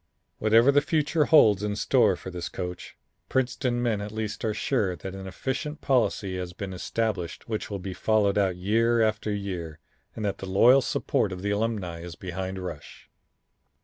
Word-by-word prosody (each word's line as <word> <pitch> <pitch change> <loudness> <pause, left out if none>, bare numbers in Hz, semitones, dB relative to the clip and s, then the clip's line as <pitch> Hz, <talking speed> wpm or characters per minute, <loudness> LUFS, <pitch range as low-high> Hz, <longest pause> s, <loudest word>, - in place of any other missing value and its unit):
Whatever 115 +5 +5
the 145 +1 +4
future 155 -1 +1
holds 110 - +6
in 105 0 -2
store - - +3
for 95 - -8
this 90 -1 -5
coach, 90 -1 -6 0.3
Princeton 125 -1 0
men 110 -4 0
at 105 0 -5
least 110 -1 -4
are 110 - +1
sure 105 -3 0
that 95 +4 -7
an 95 0 -7
efficient 140 - -4
policy 110 -8 +1
has 90 -1 -5
been 95 0 -6
established 100 -1 -3
which 110 -2 -3
will 100 - -3
be 95 0 -6
followed 105 0 +2
out 95 -3 +2
year 115 +5 +2
after 110 0 0
year, 90 -6 -4 0.4
and 110 - -4
that 100 - -2
the 95 - -6
loyal 120 +8 +6
support 105 - 0
of 90 0 -6
the 100 - 0
Alumni 100 -5 -2
is 85 -1 -8
behind 95 +1 -5
Rush. 90 -6 -8
105 Hz, 180 wpm, -26 LUFS, 95-115 Hz, 0.4 s, holds